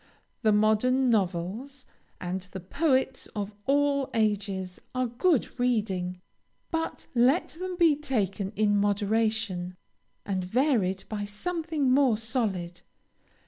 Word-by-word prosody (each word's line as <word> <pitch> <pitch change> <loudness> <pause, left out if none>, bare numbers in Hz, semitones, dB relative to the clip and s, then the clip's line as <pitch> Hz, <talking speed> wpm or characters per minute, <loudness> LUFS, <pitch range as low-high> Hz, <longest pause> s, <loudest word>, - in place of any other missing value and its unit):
The 220 -2 +4
modern 220 +5 +3
novels, 210 +7 -1 0.3
and 180 +1 -3
the 190 +1 -8
poets 265 - 0
of 205 0 -3
all 280 -1 +2
ages, 200 -4 -1
are 255 0 +1
good 255 +3 +1
reading, 195 -7 0 0.5
but 325 -1 -3
let 260 +7 +3
them 365 +2 -5
be 335 -4 +5
taken 200 -9 -1
in 210 -1 +3
moderation, 205 -2 0 0.5
and 190 -2 -1
varied 200 -3 +1
by 205 -2 -3
something 315 +5 -1
more 260 -4 +4
solid. 210 -7 -2
220 Hz, 110 wpm, -28 LUFS, 195-265 Hz, 0.5 s, be